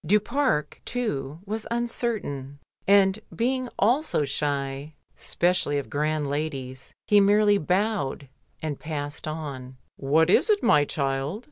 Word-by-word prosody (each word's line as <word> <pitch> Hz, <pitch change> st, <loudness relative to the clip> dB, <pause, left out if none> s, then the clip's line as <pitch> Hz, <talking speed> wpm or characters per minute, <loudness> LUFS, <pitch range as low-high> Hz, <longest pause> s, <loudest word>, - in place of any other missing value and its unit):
Du 210 Hz, +3 st, +4 dB
Pare, 240 Hz, -, +1 dB, 0.2 s
too, 155 Hz, -, -3 dB
was 215 Hz, +1 st, -4 dB
uncertain, 225 Hz, -, -3 dB, 0.3 s
and 195 Hz, 0 st, +5 dB, 0.2 s
being 255 Hz, +1 st, 0 dB
also 240 Hz, -, +2 dB
shy, 140 Hz, +1 st, -3 dB, 0.2 s
specially 175 Hz, -4 st, 0 dB
of 140 Hz, -, -5 dB
grand 150 Hz, +1 st, 0 dB
ladies, 140 Hz, -3 st, -4 dB
he 210 Hz, -, +5 dB
merely 205 Hz, 0 st, +4 dB
bowed 180 Hz, -5 st, -1 dB, 0.4 s
and 150 Hz, -3 st, -3 dB
passed 145 Hz, -1 st, -5 dB
on. 140 Hz, -5 st, -6 dB, 0.2 s
"What 160 Hz, +5 st, +3 dB
is 305 Hz, -, +4 dB
it, 415 Hz, -1 st, +3 dB
my 145 Hz, -1 st, +5 dB
child?" 140 Hz, +6 st, -2 dB
155 Hz, 125 wpm, -26 LUFS, 140-210 Hz, 0.4 s, and